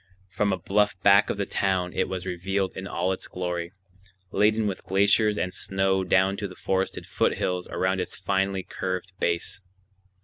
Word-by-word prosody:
From 100 Hz, +2 st, 0 dB
a 95 Hz, -, 0 dB
bluff 100 Hz, +2 st, +1 dB
back 100 Hz, +1 st, +6 dB
of -, -, -1 dB
the 100 Hz, -, -1 dB
town 95 Hz, -3 st, 0 dB
it -, -, 0 dB
was 95 Hz, -1 st, -4 dB
revealed 95 Hz, +2 st, -2 dB
in 95 Hz, -, -5 dB
all 90 Hz, 0 st, -1 dB
its 95 Hz, -, -4 dB
glory, 90 Hz, -1 st, -3 dB, 0.6 s
laden 110 Hz, +1 st, +3 dB
with 100 Hz, -2 st, -3 dB
glaciers 100 Hz, +2 st, +3 dB
and 90 Hz, -2 st, -1 dB
snow 95 Hz, 0 st, 0 dB
down 95 Hz, +2 st, +3 dB
to 100 Hz, -, -3 dB
the 95 Hz, -, -11 dB
forested 95 Hz, +1 st, -1 dB
foothills 90 Hz, -1 st, 0 dB
around 95 Hz, 0 st, 0 dB
its -, -, -5 dB
finely 95 Hz, +1 st, 0 dB
curved 95 Hz, +1 st, -4 dB
base. 85 Hz, +2 st, -1 dB
95 Hz, 170 wpm, -26 LUFS, 90-100 Hz, 0.6 s, back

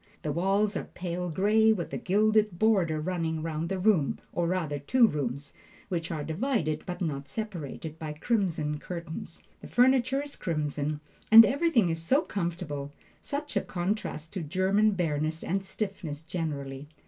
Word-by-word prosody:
The 150 Hz, -, -1 dB
walls 195 Hz, +6 st, +1 dB
are -, -, -2 dB
pale 180 Hz, 0 st, -4 dB
gray, 210 Hz, +6 st, +4 dB
with 185 Hz, -6 st, -2 dB
a -, -, -1 dB
gilded 210 Hz, 0 st, +2 dB
border 185 Hz, -7 st, +3 dB
running 160 Hz, -1 st, -2 dB
round 160 Hz, 0 st, -2 dB
the 195 Hz, -, -1 dB
room, 185 Hz, -7 st, +2 dB, 0.2 s
or 170 Hz, -1 st, 0 dB
rather 165 Hz, -5 st, -1 dB
two 240 Hz, -, +4 dB
rooms, 140 Hz, -, -2 dB, 0.4 s
which 170 Hz, -3 st, -2 dB
are 155 Hz, -3 st, -3 dB
divided, 160 Hz, -, -1 dB
but 180 Hz, 0 st, -5 dB
not 140 Hz, -5 st, -3 dB
separated, 160 Hz, -, -5 dB
by 155 Hz, -2 st, -4 dB
crimson 160 Hz, -5 st, 0 dB
curtains. 170 Hz, -1 st, -7 dB, 0.2 s
The -, -, -10 dB
furniture 260 Hz, +2 st, +3 dB
is 290 Hz, -, -9 dB
crimson, 150 Hz, -2 st, -2 dB, 0.3 s
and 225 Hz, +1 st, +12 dB
everything 270 Hz, -, +2 dB
is 165 Hz, 0 st, -3 dB
so 270 Hz, -, +3 dB
comfortable 170 Hz, -6 st, -4 dB, 0.3 s
such 290 Hz, -2 st, -4 dB
a 200 Hz, -, +3 dB
contrast 175 Hz, -4 st, -3 dB
to 190 Hz, -, -3 dB
German 190 Hz, +7 st, +2 dB
bareness 160 Hz, -3 st, -1 dB
and 195 Hz, +2 st, -1 dB
stiffness 190 Hz, -7 st, -5 dB
generally. 145 Hz, -4 st, -4 dB
175 Hz, 155 wpm, -28 LUFS, 155-210 Hz, 0.4 s, and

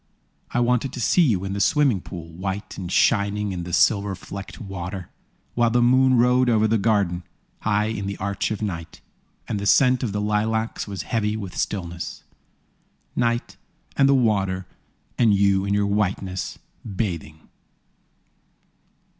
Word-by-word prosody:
I 120 Hz, -, -1 dB
wanted 125 Hz, +2 st, +1 dB
to -, -, -6 dB
see 150 Hz, +9 st, +3 dB
you 105 Hz, -, +2 dB
in 95 Hz, -, -3 dB
the 100 Hz, -, -3 dB
swimming 140 Hz, -, +3 dB
pool, 85 Hz, -3 st, -8 dB
White 95 Hz, +4 st, -5 dB
and 90 Hz, -2 st, -6 dB
shining 100 Hz, -1 st, +2 dB
in 90 Hz, -2 st, -4 dB
the 90 Hz, -, -6 dB
silver 100 Hz, +1 st, +3 dB
flecked 100 Hz, +4 st, -9 dB
water. 95 Hz, -3 st, -6 dB, 0.4 s
While 120 Hz, -1 st, +3 dB
the 120 Hz, +2 st, +2 dB
moon 130 Hz, +1 st, +5 dB
rode 125 Hz, +1 st, +4 dB
over 110 Hz, -2 st, +3 dB
the 110 Hz, 0 st, +2 dB
garden, 100 Hz, -5 st, +1 dB, 0.4 s
High 105 Hz, 0 st, +1 dB
in 100 Hz, -2 st, -4 dB
the 100 Hz, -, -4 dB
arch 100 Hz, +1 st, -2 dB
of 110 Hz, 0 st, -3 dB
night, 85 Hz, -6 st, -5 dB, 0.5 s
And 105 Hz, -, -2 dB
the 100 Hz, -, -2 dB
scent 125 Hz, +2 st, +4 dB
of 120 Hz, -, -1 dB
the 105 Hz, -, -2 dB
lilacs 110 Hz, +2 st, -1 dB
was 100 Hz, -2 st, -5 dB
heavy 110 Hz, -2 st, -1 dB
with 100 Hz, -4 st, -7 dB
stillness. 85 Hz, -4 st, -4 dB, 0.9 s
Night, 120 Hz, 0 st, -1 dB, 0.4 s
and 135 Hz, 0 st, +4 dB
the 140 Hz, -, +5 dB
water, 95 Hz, -7 st, +1 dB, 0.5 s
and 110 Hz, -4 st, +5 dB
you 100 Hz, -1 st, +3 dB
in 100 Hz, 0 st, 0 dB
your 105 Hz, 0 st, +2 dB
whiteness, 100 Hz, -2 st, -1 dB, 0.3 s
bathing! 85 Hz, -7 st, -4 dB
105 Hz, 155 wpm, -23 LUFS, 95-115 Hz, 0.9 s, moon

